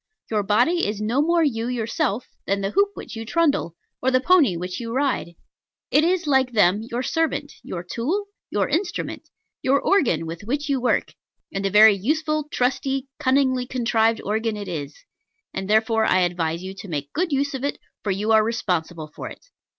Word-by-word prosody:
Your 215 -1 +2
body 245 - +2
is 210 0 -3
no 225 +6 +1
more 335 +2 +3
you 230 -6 0
yourself 245 - -1 0.2
than 200 0 0
the 195 0 -1
hoop 400 - +3
which - - -8
you 225 - -5
trundle, 285 - +1 0.3
or 260 - +2
the 255 0 +3
pony 275 - +4
which 180 +1 -4
you 230 -1 -5
ride. 260 -10 -1 0.6
It 300 - +5
is, 360 +1 +1
like 265 -3 +2
them, 205 -1 +4
your 235 +2 -4
servant, 310 -1 -1
your 175 -1 -6
tool, 290 - -2 0.2
your - - 0
instrument, 350 +1 -3 0.3
your 275 +2 +3
organ, 250 - +2
with 165 +1 -6
which 285 +8 -3
you 270 -2 +1
work: 250 - +1 0.4
and 195 0 -1
a - - 0
very 210 +2 +8
useful, 305 - 0
trusty, 265 +1 -1
cunningly 260 -2 +2
contrived 230 -3 +1
organ 220 +1 -1
it 205 -1 -6
is; 150 -5 -5 0.6
and 190 +1 -4
therefore 220 +1 +3
I 185 - +3
advise 170 -1 -1
you 190 +1 -6
to - - -8
make 145 -4 -4
good 340 +1 0
use 280 +1 0
of 265 -1 -4
it, 285 - -1 0.3
for 210 - -2
you 205 +3 0
are 220 -1 +6
responsible 175 -8 -2
for - - -6
it. - - -13
230 Hz, 190 wpm, -23 LUFS, 200-280 Hz, 0.6 s, very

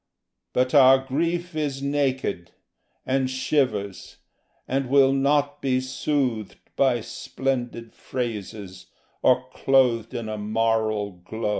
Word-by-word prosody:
But 125 0 +1
our 135 -2 +8
grief 170 +5 -2
is 140 -3 -2
naked, 135 -11 -1 0.6
and 130 0 +1
shivers, 110 - -1 0.5
and 135 -1 -1
will 135 0 +5
not 145 +1 +1
be 130 -2 +1
soothed 130 -4 -2 0.2
By 130 -4 +2
splendid 120 -1 -4
phrases, 105 -6 -6 0.3
or 130 0 +3
clothed 130 -3 +2
in 115 -2 -4
a 110 -1 -4
moral 110 -1 0
glow. 105 +5 -5
130 Hz, 110 wpm, -24 LUFS, 110-135 Hz, 0.6 s, our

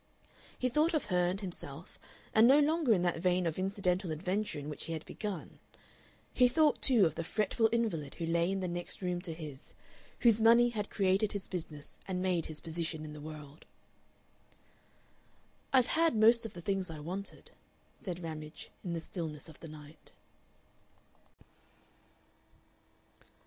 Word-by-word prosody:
He 255 - +1
thought 305 +7 +2
of 305 - 0
her 180 0 +3
and 185 +2 -1
himself, 190 -4 -8 0.3
and 220 +2 +7
no 270 +3 +7
longer 305 -2 +3
in 185 -5 +4
that 175 -2 +1
vein 180 +1 +2
of 165 +1 -1
incidental 185 -2 0
adventure 185 +6 -2
in 145 0 -6
which 150 -2 -6
he 165 - -4
had 160 -1 -5
begun. 205 -6 -6 0.7
He 250 - +6
thought, 300 +4 +3
too, 240 -8 +5
of 160 - +1
the 165 - -3
fretful 215 +5 +1
invalid 210 -12 -1
who 165 - -3
lay 170 +2 +2
in 195 0 -1
the 185 - -1
next 175 +2 -5
room 180 -1 -1
to 175 -2 -3
his, 155 -4 -9 0.5
whose 230 -2 +5
money 235 +2 +7
had 210 -3 -3
created 195 +1 +2
his 200 -2 -4
business 155 -5 -7
and 185 -1 -2
made 180 -3 0
his 155 -1 -7
position 160 -1 -3
in 150 - -7
the 150 - -9
world. 150 -1 -10 2.0
"I've 260 -3 +5
had 330 -1 +2
most 225 +2 +5
of 215 - -14
the 175 - -8
things 195 0 -1
I 160 -2 -7
wanted," 185 +6 -6 0.5
said 180 -4 -5
Ramage, 155 -1 -7
in 175 - -3
the 165 - -1
stillness 160 -3 -6
of 155 - -14
the 165 - -9
night. 150 0 -13
180 Hz, 165 wpm, -33 LUFS, 160-215 Hz, 2.0 s, and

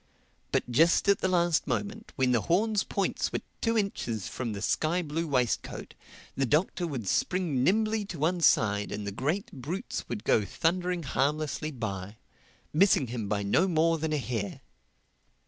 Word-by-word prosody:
But - - +1
just 165 - +4
at 200 - +4
the - - +1
last 175 -3 +2
moment, 220 +2 -3
when 130 -2 +2
the 120 -3 +3
horns' 205 - +2
points 200 - -1
were - - -2 0.2
two 230 0 +1
inches 120 - -2
from 125 -3 -4
the 100 - -5
sky 170 +9 +1
blue 160 +2 -2
waistcoat, 125 -5 -1 0.4
the 135 -1 0
Doctor 170 +5 +1
would 130 -10 -4
spring 165 - +1
nimbly 215 +5 +2
to 185 -4 -7
one 170 +4 0
side 105 -8 +3
and 105 - -4
the 100 - -3
great 150 - -2
brutes 150 +9 -5
would 115 -3 -4
go 110 - +3
thundering 175 - -1
harmlessly 150 +3 -1
by, 105 -7 -5 0.6
missing 170 -3 +4
him 115 -4 -4
by 105 -1 0
no 165 - +3
more 165 -1 +2
than 160 0 -2
a 150 - +1
hair. 115 -7 -3
155 Hz, 165 wpm, -29 LUFS, 120-180 Hz, 0.6 s, just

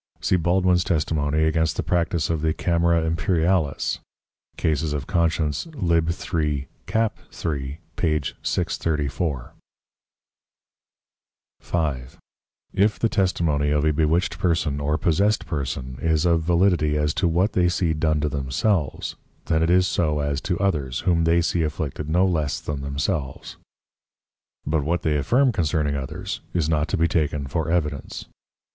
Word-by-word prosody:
See - - +1
Baldwin's 90 +1 +2
Testimony 75 -2 0
against 80 0 +1
the - - 0
Practice 85 -3 0
of 80 -2 -1
the 80 0 +1
Camera 85 -1 +2
Imperialis, 80 -1 0 0.6
Cas. 75 -3 +1
Consc. 85 - -1
L. 85 0 +3
3. 75 -5 -2 0.2
c. 115 +1 +2 0.2
3. 70 -3 -4 0.2
p. 75 -3 +1 0.2
634. 75 -3 -1 2.1
5. 70 -7 -2 0.6
_If 105 +2 +3
the 115 - +1
Testimony 85 -8 +1
of 75 0 +1
a 80 - +3
bewitched 80 +3 0
or 75 -4 +1
possessed 100 +7 +1
Person, 65 -4 -4
is 80 +1 +1
of 85 -1 +3
validity 85 -3 +2
as 75 0 +1
to 90 - +1
what 90 +6 +1
they 90 -1 +3
see 85 -2 +1
done 80 0 +1
to 75 - 0
themselves, 70 - -1 0.3
then 80 -1 +1
it 80 - +2
is 90 +1 +4
so 80 -4 +1
as 70 -1 -1
to 90 - -1
others, 75 -10 -1
whom 85 -3 +2
they 85 +1 +3
see 85 0 0
afflicted 75 -1 -3
no 90 +4 +3
less 80 -6 0
than 75 -2 -4
themselves:_ 70 0 -3 1.1
But 75 0 0
what 85 +4 -1
they 75 -2 +1
affirm 125 - +3
concerning 75 -6 0
others, 65 -2 -5
is 85 -4 +1
not 80 -1 +1
to - - -1
be 85 +1 +3
taken 75 -3 0
for 80 +4 -2
Evidence. 75 -5 -2
80 Hz, 140 wpm, -23 LUFS, 75-85 Hz, 2.1 s, is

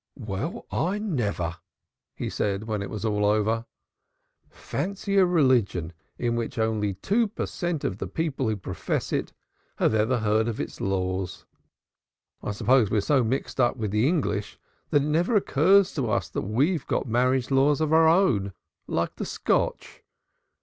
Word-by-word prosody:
"Well, 125 - -4
I 185 +5 0
never!" 105 - -2 0.6
he - - -4
said 100 0 -1
when 110 -2 -3
it 100 - -5
was 110 0 -5
over. 105 +2 +1 0.8
"Fancy 200 +5 -3
a 185 - +5
religion 125 - +2 0.2
in 120 -1 0
which 115 0 -3
only 110 -3 0
two 220 - +1
per 205 - -4
cent. 175 -4 -3
of 95 - -2
the - - -3
people 140 -7 -2
who 110 - 0
profess 95 - -3
it - - -1 0.4
have - - +2
ever 110 +4 +2
heard 110 0 +1
of 115 - -3
its - - -5
laws. 95 -1 -2 1.0
I - - -4
suppose 115 +2 +3
we're 105 - +2
so 135 +4 +2
mixed 130 +3 -2
up 120 +1 +2
with 110 -4 -2
the 105 +5 +2
English, 110 - -1 0.3
that 145 - +3
it - - -1
never 170 +9 +1
occurs 195 +2 +4
to 130 -7 -1
us - - -1
we've 135 - 0
got - - 0
marriage 125 +2 +1
laws 135 +2 +3
of 155 0 +1
our 160 0 +6
own 125 - +3 0.3
like - - -2
the - - -3
Scotch. - - -1
120 Hz, 160 wpm, -26 LUFS, 105-160 Hz, 1.0 s, our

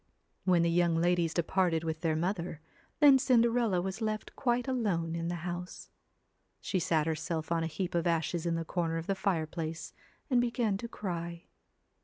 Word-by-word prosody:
When 180 -3 +4
the 170 - +2
young 170 -1 +3
ladies 170 0 +2
departed 170 -1 +1
with 160 -1 -3
their 160 -2 +1
mother, 170 -1 -2 0.4
then 285 -3 +8
Cinderella 235 -7 +3
was 190 +3 -4
left 215 -1 -3
quite 245 0 0
alone 195 -11 0
in 165 0 -2
the 175 - -2
house. 180 0 -6 0.7
She 190 - -1
sat 160 -2 +1
herself 160 0 -2
on 165 -1 +2
a - - 0
heap 175 +3 -3
of 170 0 +1
ashes 165 +1 0
in 170 - +1
the 165 0 -2
corner 165 -1 -1
of 165 - -4
the 195 - 0
fireplace 165 -4 -2 0.3
and 250 -4 +3
began 235 -3 0
to 235 - -6
cry. 170 -5 -5
175 Hz, 175 wpm, -31 LUFS, 165-205 Hz, 0.7 s, then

